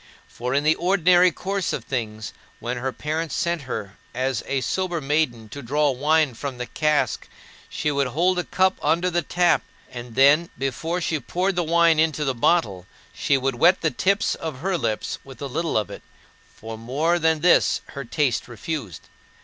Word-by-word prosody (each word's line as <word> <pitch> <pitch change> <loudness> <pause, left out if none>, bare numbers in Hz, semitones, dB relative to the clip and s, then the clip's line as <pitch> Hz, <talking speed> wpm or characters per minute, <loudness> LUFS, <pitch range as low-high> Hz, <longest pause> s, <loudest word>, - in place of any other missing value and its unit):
For, 125 +2 -4
in 145 - +2
the 155 +1 +4
ordinary 180 0 +4
course 195 +3 -2
of - - -3
things, 110 -4 -4 0.3
when 120 +1 -3
her 130 +2 -2
parents 155 +3 -3
sent 170 -2 -1
her 100 -5 -5 0.2
as 130 -1 -1
a 140 -1 0
sober 185 +3 -1
maiden 135 -6 -1
to 140 +6 -8
draw 145 +4 +1
wine 150 +1 +2
from 130 +2 -6
the 125 - -4
cask, 150 +3 0 0.4
she 150 - -1
would 140 -1 +1
hold 175 +8 +1
a - - -1
cup 190 +1 +1
under 170 +4 +1
the 175 0 +1
tap; 175 +3 +2 0.3
and 120 -2 -8
then, 145 +6 +5
before 135 +7 -2
she 160 -2 -1
poured 180 - -1
the 175 - +1
wine 165 -1 +4
into 155 -1 +1
the 135 - +1
bottle, 105 - +1 0.3
she 140 - +1
would 135 +1 -1
wet 175 +4 +5
the 160 - +1
tips 200 - +1
of 150 -5 -6
her 190 +2 0
lips 110 -10 -2
with 135 -1 -13
a 145 - -4
little 160 +3 -1
of 105 - -1
it, - - -8 0.5
for 110 0 -9
more 150 +9 0
than 160 -1 +2
this 175 +1 +4
her 140 - -6
taste 130 -1 -1
refused. 115 - -6
150 Hz, 185 wpm, -23 LUFS, 125-170 Hz, 0.5 s, then